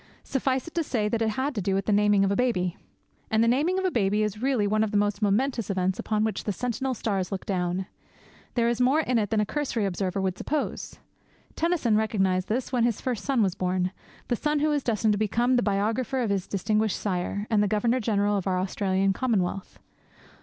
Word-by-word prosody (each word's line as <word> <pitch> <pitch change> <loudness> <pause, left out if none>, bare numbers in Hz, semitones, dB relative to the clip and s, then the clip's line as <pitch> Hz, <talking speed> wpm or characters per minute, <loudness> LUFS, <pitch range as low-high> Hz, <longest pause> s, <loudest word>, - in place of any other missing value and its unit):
Suffice 265 +1 -1
it 330 - -9
to 340 - +1
say 225 -8 -1
that 230 +1 -1
it 225 - +2
had 260 +6 -1
to 210 - -2
do 190 +1 0
with 195 0 -1
the - - +1
naming 205 -1 +4
of 195 - 0
a - - +1
baby. 185 -8 0 0.5
And 220 0 +3
the - - +3
naming 295 +10 +2
of 380 - 0
a 370 - +1
baby 210 -3 +1
is 210 0 -3
really 255 -5 +1
one 215 +1 +2
of 220 - 0
the 205 - 0
most 205 0 0
momentous 225 +2 +1
events 185 -1 0
upon 215 -1 0
which 220 -3 -2
the 210 - 0
sentinel 250 +5 -2
stars 195 -4 -2
look 195 - -4
down. 180 -1 -1 0.7
There 235 -2 +2
is 235 +1 0
more 270 +5 +4
in 250 -6 +1
it 205 -2 -1
than 220 - +1
a 210 - +2
cursory 250 -4 -1
observer 190 0 -2
would 190 -1 -2
suppose. 300 -1 -3 0.6
Tennyson 325 -10 +1
recognized 190 -4 +1
this 245 +4 -2
when 245 -3 +2
his 235 -3 +1
first 245 -5 -3
son 260 -5 +2
was 190 -3 +1
born, 185 0 -1 0.4
the 240 - +1
son 300 +5 0
who 300 +1 +2
was 295 -1 +1
destined 220 -3 +1
to 205 - 0
become 235 +4 +2
the 245 - +3
biographer 220 +5 0
of 225 -4 0
his 195 -2 -1
distinguished 215 +2 0
sire 200 +1 -2
and 215 -2 +4
the 210 - +2
Governor 230 +5 +1
General 205 -2 +1
of 195 - -3
our 185 -1 +1
Australian 190 +1 0
Commonwealth. 195 -5 -1
215 Hz, 225 wpm, -26 LUFS, 195-250 Hz, 0.7 s, naming